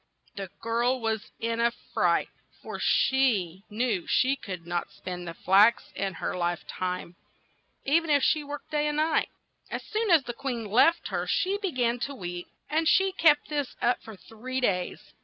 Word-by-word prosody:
The 195 -2 -5
girl 235 +3 +1
was 220 -2 -2
in 230 0 -1
a 235 0 +4 0.2
fright, - - +2 0.3
for - - -6
she 210 -10 +2
knew 215 -4 -1
she 265 +2 +3
could 185 -9 -7
not 175 0 -2
spin 180 -1 -7
the 170 -1 -6
flax 200 +7 +4
in 195 -1 -2
her - - -3
life 175 -1 -1
time, 180 -1 -4 0.7
e 290 +5 +4
ven 330 -1 -8
if 285 -2 +4
she 305 -1 +3
worked 290 0 -8
day 300 0 +1
and 295 0 -1
night. 315 +1 +2 0.4
As - - -4
soon 435 0 -2
as 330 -5 +6
the 240 - -5
queen 240 -3 -4
left 250 +11 +3
her - - -2
she 400 0 +1
be 390 -3 -2
gan 245 -3 0
to 280 +3 -3
weep, 175 -4 -6 0.2
and 320 +1 +1
she 385 +3 +4
kept 310 -5 +4
this 290 -3 -2
up 245 - +1
for 220 - -10
three 245 +6 -6
days. 180 -8 -2
240 Hz, 185 wpm, -27 LUFS, 195-295 Hz, 0.7 s, as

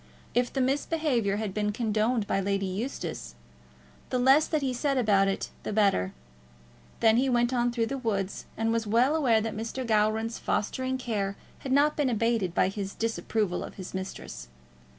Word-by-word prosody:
If 245 0 +1
the 270 - -1
misbehaviour 270 -5 +1
had 210 -2 -3
been 210 0 0
condoned 220 +1 0
by 195 - 0
Lady 195 0 0
Eustace, 205 +9 -4 0.7
the 255 - 0
less 270 +5 +5
that 310 -3 0
he 260 -2 0
said 275 +2 0
about 205 -5 +3
it 195 - -2
the - - -4
better. 200 - +2 0.9
Then 225 0 +5
he 265 +2 +2
went 240 0 +2
on 240 -1 +2
through 235 -1 0
the 270 +3 -4
woods, 200 -5 -2
and 225 0 +1
was 225 -1 0
well 245 +8 +3
aware 240 -8 +3
that 220 0 -3
Mr. 230 +4 -4
Gowran's 220 +1 +1
fostering 260 +4 -1
care 205 -6 -2 0.2
had 265 - -5
not 290 +3 +4
been 290 -3 +1
abated 225 -6 0
by - - +4
his 195 0 -5
disapproval 220 -4 -1
of - - -9
his 185 -2 -8
mistress. 185 - -6
225 Hz, 175 wpm, -28 LUFS, 205-255 Hz, 0.9 s, less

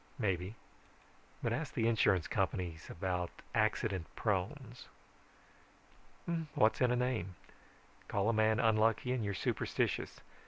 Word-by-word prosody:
Maybe; 95 -2 -1 0.9
but 115 - +1
ask 145 +3 -3
the 115 -1 +2
insurance 95 -6 +3
companies 90 -3 -2
about 90 0 -2 0.2
accident 95 -7 +1
prones. - - -2 1.7
What's 115 -4 +3
in 125 - +5
a 125 - +2
name? 120 -8 -1 0.7
Call 100 +1 0
a 115 - +3
man 110 +1 +3
unlucky 115 +1 +3
and 125 -3 0
you're 100 -1 -2
superstitious. - - -1
110 Hz, 115 wpm, -34 LUFS, 95-115 Hz, 1.7 s, in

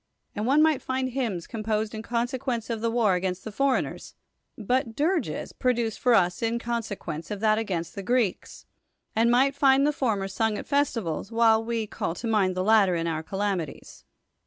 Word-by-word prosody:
xVnd 210 - -2
one 285 +5 +4
might 315 -3 +3
finds 260 -1 -2
hymns 225 -10 -2
composed 215 -1 -2
in 220 - -5
conserpience 240 0 -2
of 225 -2 -3
the 230 - +1
war 225 -4 +2
against 180 0 -2
th(i 220 - -5
forci^ni^'s, 275 +2 -1 0.4
luit 240 +2 0
dirges 335 +4 -1
produced 240 -3 0
for 245 -2 +4
us 180 -3 +2
in 230 0 0
cons('(juence 225 -9 -4
of 210 - -4
that 215 0 +3
agaijist 175 -6 -3
the 200 - -5
CJreeks, 235 -1 -1 0.5
and 230 +1 +3
might 260 +3 +4
find 275 0 +4
the 300 - +2
former 215 -9 -1
sung 215 +2 -1
at - - -6
the - - -26
festivals, 230 - -1
while 225 -1 +4
we 230 -1 -2
call 170 -4 -4
to 230 - -7
n'.'ind 205 -5 +2
the 185 - -1
latter 200 -3 +4
in 165 0 -1
our 160 -1 -1
calan;i 195 +1 -1
ties. - - -16
225 Hz, 190 wpm, -26 LUFS, 200-250 Hz, 0.5 s, one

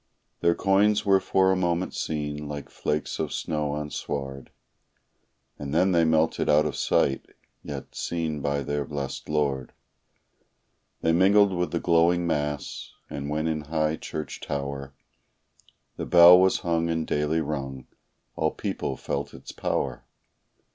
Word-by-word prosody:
Their 85 0 +3
coins 100 +2 +3
were 95 -1 +5
for 95 0 +2
a - - +3
moment 90 0 -1
seen, 75 -1 -3
like 75 -2 -6
flakes 75 0 -2
of - - -2
snow 75 -2 -2
on 75 0 -4
sward, 70 0 -5 1.1
And 70 +1 -4
then 95 +3 +4
they 85 -2 +4
melted 80 0 +2
out 75 +1 +5
of 75 - -2
sight, 65 - +1 0.3
yet, 70 -3 -7
seen 80 -3 -3
by 70 0 -1
their 75 +2 -2
blest 70 -1 -5
Lord, 70 -4 -1 1.3
They 80 - +2
mingled 95 +3 +5
with 90 0 -1
the 85 - -1
glowing 85 +1 +3
mass, 75 -3 -3 0.2
and 70 0 -4
when 75 +1 -1
in 80 -1 -1
high 80 0 0
church 75 0 -6
tower 70 -1 -5 1.0
The - - -4
bell 90 +1 +9
was 95 0 +3
hung 85 -2 0
and 80 -1 -1
daily 75 +2 0
rung, 70 -4 -4 0.5
all - - +1
people - - -4
felt - - -4
its - - -10
power. - - -2
75 Hz, 145 wpm, -26 LUFS, 75-85 Hz, 1.3 s, bell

